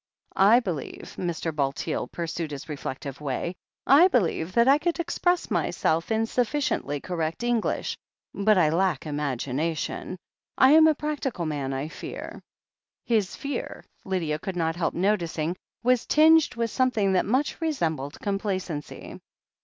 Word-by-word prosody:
I 210 +5 +6
believe," 175 - -6
Mr. 170 -2 -3
Bulteel 140 -2 -1
pursued 165 -1 -4
his 145 -2 -7
reflective 140 -2 -6
way, 145 +5 -2 0.3
I 295 +7 +7
believe 185 - 0
that 235 +1 +4
I 280 +2 +6
could 345 +2 -1
express 350 +1 0
myself 165 +6 0
in 220 0 +2
sufficiently 240 - -1
correct 165 - -3
English. 240 -2 0 0.4
But 210 0 +3
I 165 -4 +4
lack 185 +2 +1
imagination. 145 +4 -3 0.4
I 260 - +6
am 315 +1 +8
a 310 - +4
prac 300 0 -3
tical 210 -11 -3
man, 140 -3 -2
I 135 +2 -3
fear." - - -8 0.6
His 215 -6 +1
fear, 280 -3 -5 0.2
Lydia 165 -5 -1
could 190 +2 -5
not 165 -2 0
help 175 -1 -1
noticing, 175 -4 0 0.3
was 250 0 +2
tinged 315 -1 +5
with 230 -1 -1
something 225 -7 +1
that 185 - +2
much 260 +9 0
resembled 160 - -2
complacency. 190 -6 -4
185 Hz, 140 wpm, -26 LUFS, 155-245 Hz, 0.6 s, am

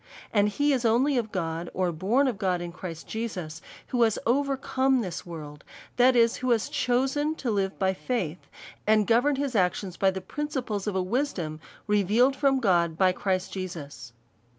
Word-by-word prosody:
And 205 -1 +4
he 290 +7 +1
is 255 -2 0
only 245 +5 +3
of 220 -2 -4
God, 165 -2 -3
or 185 -1 +1
born 210 - +1
of 235 -6 -2
God 185 -3 0
in 175 0 -5
Christ 170 -2 -8
Jesus, 180 -8 -5 0.3
who 245 - 0
has 225 -2 +3
overcome 270 0 +1
this 180 -4 -5
world; 150 -3 -8 0.3
that 250 +1 +5
is, 230 -1 +4
who 255 0 -2
has 230 -2 +2
chosen 270 +5 0
to 250 -6 -2
live 195 -2 -1
by 190 -1 +1
faith, 185 -6 -3 0.4
and 215 -1 +4
govern 245 +6 +3
his 275 -2 -2
actions 185 -1 0
by 195 - +3
the 190 0 -3
principles 245 -3 -4
of 205 - -1
a 190 - +1
wisdom 185 - -2 0.3
revealed 210 +6 +3
from 270 -1 +2
God 170 -7 +2
by 185 +1 +4
Christ 185 0 -2
Jesus. 165 -9 -7
210 Hz, 175 wpm, -27 LUFS, 180-255 Hz, 0.4 s, that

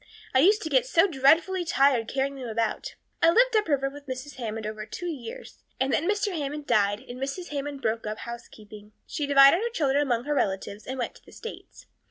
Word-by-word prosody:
I 260 - +5
used 410 +9 +4
to 315 - -3
get 260 -4 +2
so 330 +7 +4
dreadfully 335 +4 +3
tired 275 -8 +2
carrying 275 +1 -1
them 265 -3 -7
about. 225 - -2 0.3
"I 330 - +6
lived 485 +7 +4
up 425 -1 +2
river 275 -3 +1
with 285 +1 -10
Mrs. 260 +2 -6
Hammond 225 -3 -4
over 215 0 -5
two 355 - -7
years, 350 - -7 0.2
and 265 0 +1
then 340 - +1
Mr. 415 -2 0
Hammond 295 -1 -4
died 205 -3 +2
and 250 -1 -10
Mrs. 280 +7 -4
Hammond 285 -1 -5
broke 220 0 -1
up 215 0 -4
housekeeping. 215 -3 -10
She 290 - -3
divided 275 +2 +7
her 470 - -1
children 290 - +1
among 245 -5 0
her 295 +2 -1
relatives 200 -4 -2
and 260 - -4
went 245 - -3
to - - -24
the - - -14
States. 460 - -10
275 Hz, 215 wpm, -26 LUFS, 235-325 Hz, 0.3 s, divided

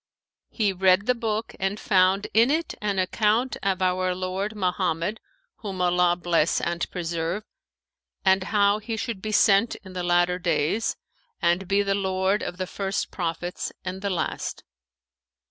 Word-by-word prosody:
He 210 -4 0
read 185 +1 +3
the 250 - +3
book 225 -2 -3
and 195 +2 -1
found 190 +1 +3
in 230 +3 +5
it 320 +3 0
an 205 -2 -1
account 215 +6 +1
of 190 -1 0
our 185 0 +1
lord 190 +3 -3
Mohammed 180 +1 -1 0.4
(whom 195 -4 -6
Allah 180 -1 +3
bless 170 -2 +1
and 170 0 -2
preserve!) 170 +2 -3 0.8
and 190 0 +4
how 205 0 +3
he 220 +1 -4
should 220 -3 -4
be 215 - -3
sent 205 +1 +4
in 190 -1 -11
the 180 - -3
latter 175 0 +2
days[FN#513] 175 +4 0 0.5
and 175 +2 +2
be 200 +1 +2
the 200 0 +1
lord 190 +1 0
of 180 - -5
the 185 - -2
first 195 +1 -3
Prophets 175 0 -3
and 185 +1 -4
the 200 - -1
last. 185 - -3
190 Hz, 155 wpm, -25 LUFS, 180-210 Hz, 0.8 s, in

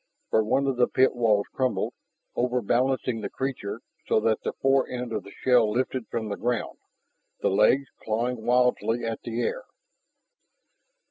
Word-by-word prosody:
For 110 - +4
one 135 +6 +1
of 135 -2 0
the 125 - +4
pit 130 0 +3
walls 110 -4 +2
crumbled, 130 -2 0 0.4
over 125 +1 +1
balancing 125 0 +1
the - - -4
creature 130 -7 -4 0.3
so - - +3
that 110 -1 +1
the - - -3
fore 135 0 +2
end 125 -1 -4
of - - -1
the 100 - -12
shell 125 -4 +5
lifted 125 +1 -1
from 115 -2 -3
the 100 - -4
ground, 120 +1 -2 0.6
the - - +2
legs 105 +8 +4 0.2
clawing 115 +2 -2
wildly 120 -1 +2
at 115 -1 -3
the 115 0 -3
air. - - -2
120 Hz, 160 wpm, -26 LUFS, 110-130 Hz, 0.6 s, shell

